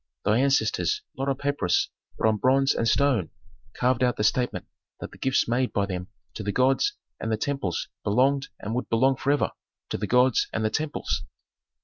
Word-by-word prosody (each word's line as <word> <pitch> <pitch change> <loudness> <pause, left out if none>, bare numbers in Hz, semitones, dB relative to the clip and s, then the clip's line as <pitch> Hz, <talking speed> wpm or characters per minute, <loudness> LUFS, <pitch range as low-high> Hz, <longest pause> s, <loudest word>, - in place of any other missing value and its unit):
Thy 105 +3 +3
ancestors, 140 - +1
not 135 +1 -2
on 135 - 0
papyrus, 140 -12 0 0.3
but - - +2
on 110 -1 +2
bronze 135 +4 +3
and 115 - 0
stone 125 - +2 0.4
carved 125 0 +1
out 125 -1 +2
the 105 - 0
statement 120 +3 0 0.3
that - - -7
the - - -15
gifts 130 0 +1
made 125 +2 +1
by 100 - +1
them 90 -2 -5 0.3
to - - -6
the 100 0 -2
gods 135 - +2 0.3
and 110 - -3
the 110 - +1
temples 110 - -2 0.2
belonged 135 +6 +2
and 105 - -4
would 125 - -3
belong 130 +4 +3
forever 140 +3 +1 0.4
to - - -3
the 105 - -2
gods 125 +1 +3
and 110 - -1
the 110 - +1
temples." 150 +5 -2
125 Hz, 190 wpm, -26 LUFS, 110-135 Hz, 0.4 s, Thy